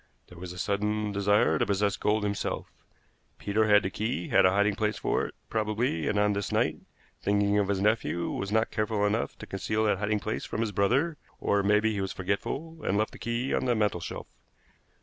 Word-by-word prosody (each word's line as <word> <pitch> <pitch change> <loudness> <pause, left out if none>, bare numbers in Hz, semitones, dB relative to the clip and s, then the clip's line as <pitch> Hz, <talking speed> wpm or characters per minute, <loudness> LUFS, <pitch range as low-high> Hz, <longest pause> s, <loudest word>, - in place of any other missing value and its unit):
There 90 - -13
was 90 0 -7
a 90 - -9
sudden 105 +2 -1
desire 100 -5 +2
to - - +2
possess 100 0 +1
gold 105 0 +1
himself. 100 0 -3 0.7
Peter 110 +2 +1
had 105 -1 +6
the 95 - -2
key, 110 -3 -2
had - - +5
a - - +5
hiding 100 +2 +2
place 105 0 -1
for - - 0
it, - - -13
probably; 110 -6 -1
and 105 - 0
on 105 0 +3
this 100 -1 -3
night, - - +1 0.4
thinking 100 0 +2
of 100 - +1
his 100 -1 0
nephew, 105 -5 +1
was 100 +1 -3
not 110 +1 +2
careful 105 -2 0
enough 105 +3 -1
to - - -8
conceal 110 +3 -1
that 105 -3 +2
hiding 105 +1 0
place 110 +2 -3
from 110 - -3
his 110 -2 -1
brother, 125 - +1 0.2
or 100 - +1
it 100 - -1
may 105 +1 +5
be 110 +1 +1
he 100 - -2
was 95 - -3
forgetful, 140 - -3
and 100 - +1
left 110 +1 0
the - - -12
key 120 +3 -2
on - - 0
the 125 -2 +2
mantelshelf. 105 -6 -2
105 Hz, 215 wpm, -28 LUFS, 100-110 Hz, 0.7 s, had